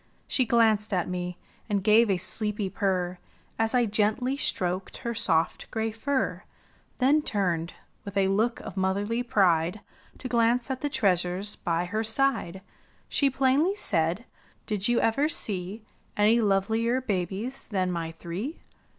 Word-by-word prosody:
She 255 -3 +1
glanced 220 -2 +3
at 180 - 0
me, 180 -1 -4 0.5
gave 220 +2 +5
a 190 - +2
sleepy 210 +1 -2
purr. 185 -3 -1 0.4
As 225 +2 +1
I 245 -1 +4
gently 220 +5 +1
stroked 185 -8 -2
her 235 -2 -3
soft 165 -8 0
gray 225 -1 -2
fur; 265 +5 -1 0.6
Then 280 +4 +4
turned, 180 - -1 0.3
with 200 0 -6
a 195 -1 +3
look 220 +5 +1
of - - -8
motherly 200 +5 0
pride. 190 -6 +2 0.4
To - - -6
glance 240 +2 +2
at 260 - -4
the 290 - -1
treasures 185 -2 0
by 170 0 -1
her 215 +5 -2
side. 220 -6 0 0.5
She 280 - +2
plainly 275 +8 +2
said, 170 - 0 0.4
''Did 210 -2 -1
you 240 0 +3
ever 275 +7 +2
see 200 - -2 0.3
Any 215 +3 +4
lovelier 220 +4 +1
babies 210 +2 -3
than 185 -4 0
my 165 -2 -3
three? 180 - -6
210 Hz, 140 wpm, -27 LUFS, 185-235 Hz, 0.6 s, gave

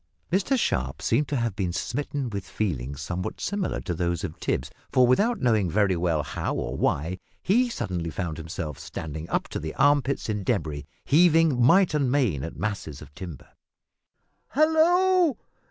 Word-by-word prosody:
Mr 195 +9 +2
Sharp 65 - -1
seemed 135 +6 +1
to 145 - -2
have 115 -5 -1
been 95 -3 -1
smitten 140 +5 -3
with 100 -3 -5
feelings 70 - -3
somewhat 90 +5 -4
similar 200 -1 -2
to 90 - -3
those 85 0 -1
of 80 -4 -5
Tipps, 70 +5 -2 0.2
for, 130 -2 +5
without 205 - +3
knowing 110 -7 +2
very 100 +1 +2
well 85 -3 0
how - - -3
or - - -3
why, 85 +6 0 0.2
he 240 +6 +3
suddenly 90 - -3
found 80 -2 -4
himself 80 -2 -5
standing 80 +1 -6
up - - 0
to - - -4
the 80 0 -5
armpits 140 0 +2
in 105 -2 -2
debris, 80 - -2 0.2
heaving 160 -4 +4
might 170 +8 +5
and 140 -4 +1
main 120 - +1
at 80 - -6
masses 100 -9 -4
of - - -15
timber. 85 -6 -9 1.1
"Hallo! 335 +1 +4
105 Hz, 165 wpm, -26 LUFS, -, 1.1 s, for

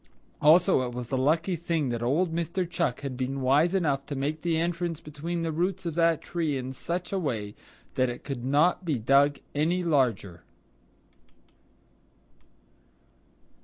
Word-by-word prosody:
Also, 170 +1 +5
it 125 -1 -3
was 125 -1 -6
a - - +1
lucky 160 +7 +1
thing 165 -4 -1
that 120 -1 -2
old 160 +8 +1
Mr. 170 +2 -1
Chuck 170 -7 -1
had 140 -2 -4
been 130 +2 -3
wise 145 +8 +3
enough 145 -7 +1
to 145 - -4
make 145 +3 -2
the 170 -2 0
entrance 170 -1 -1
between 165 +3 -5
the 165 - -1
roots 180 +4 -1
of 170 - -2
that 165 -1 +2
tree 160 -5 -1
in 130 0 -5
such 175 +6 -4
a 195 - +1
way 110 - -3 0.4
that 130 -1 +1
it 120 - -7
could 135 -4 -5
not 150 +8 +2
be 155 -6 0
dug 140 +5 +3 0.2
any 170 +5 +1
larger. 115 - 0
150 Hz, 160 wpm, -27 LUFS, 130-170 Hz, 0.4 s, Also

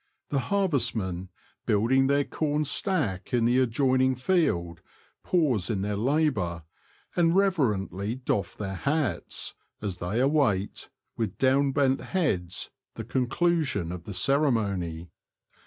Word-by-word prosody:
The 140 - +1
harvestmen, 115 - 0 0.4
building 125 +6 +3
their 140 +1 +3
corn 150 +1 -1
stack 135 - 0
in 115 -1 +2
the 125 +2 +4
ad 130 - +2
joining 130 +1 +2
field, 105 - 0 0.4
pause 135 - +1
in 95 -3 -1
their 105 0 -1
labour, 110 - 0 0.5
and 170 -1 +3
reverently 115 - +1
doff 125 -6 -2
their 100 -2 -4
hats, 140 +7 -2 0.3
as 100 -4 -4
they 90 +6 -2
await, 130 -8 +1 0.3
with 110 -5 -2
down 135 +1 +3
bent 135 -1 +2
heads, 95 - -2 0.2
the 115 - -5
conclusion 130 - 0
of 90 -2 -7
the 105 - -6
ceremony. 100 - 0
125 Hz, 125 wpm, -27 LUFS, 95-145 Hz, 0.5 s, the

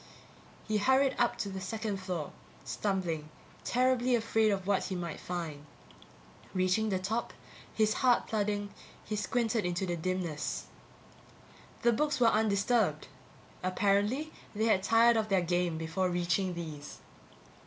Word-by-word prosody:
He 215 -1 +1
hurried 265 +4 +3
up 240 -1 +2
to 200 - -3
the 190 -1 -5
second 210 +2 -3
floor, 180 -5 -4 0.3
stumbling, 175 -7 -2 0.3
terribly 255 0 +2
afraid 225 -1 +2
of 195 -2 -1
what 200 -1 +1
he 190 - -3
might 170 -3 -4
find. 165 -5 -5 0.9
Reaching 185 +4 +2
the 190 - +1
top, 215 +6 -2 0.4
his 215 -1 +2
heart 250 -2 +4
thudding, 205 -1 -1 0.3
he 215 - -3
squinted 225 +1 0
into 180 +2 -1
the 175 -1 -1
dimness. 170 -2 -2 1.2
The 235 - +5
books 295 +5 0
were 235 -2 +6
undisturbed. 215 +2 +1 0.5
Apparently 205 +10 +1 0.2
they 220 +2 +1
had 215 -4 +3
tired 230 +3 +5
of 215 -1 0
their 195 -2 +3
game 175 -1 0
before 165 +3 -1
reaching 175 +1 0
these. 155 -4 -7
200 Hz, 135 wpm, -31 LUFS, 180-225 Hz, 1.2 s, were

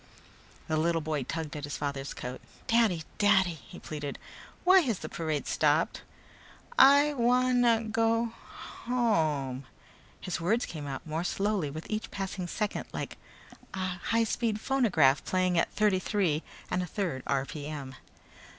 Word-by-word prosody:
The 155 - 0
little 165 +1 +2
boy 155 -2 -2
tugged 155 +4 -4
at 150 - -6
his 145 0 -4
father's 140 -1 -4
coat. 125 +1 -6 0.2
"Daddy! 225 -8 +3 0.2
Daddy," 190 -4 +4 0.2
he - - -10
pleaded, 145 -2 -5 0.5
"why 370 +1 +7
has 245 - 0
the - - -7
parade 155 -3 -2
stopped? 155 +1 +1 0.7
I 290 - +7
wan 250 0 +3
na 230 -2 +4
go 225 +1 +1 0.5
home 155 - +1 0.3
" - - -27
His 180 -2 -4
words 220 +8 +1
came 150 -4 -6 0.2
more 160 +1 -2
slowly 195 -4 0
with 155 +3 -7
each 215 0 -3
passing 195 -2 -4
second, 210 +4 -2
like - - -5 0.6
a 185 -1 -3
high 230 +1 +3
speed 225 -1 -1
phonograph 195 - +3
playing 185 -2 +1
at - - 0
thirty 210 -3 +2
three 185 -7 0 0.3
and 180 - +1
a 180 - -3
third 175 -8 -2
r.p.m. 140 0 -3
180 Hz, 145 wpm, -29 LUFS, 150-225 Hz, 0.7 s, why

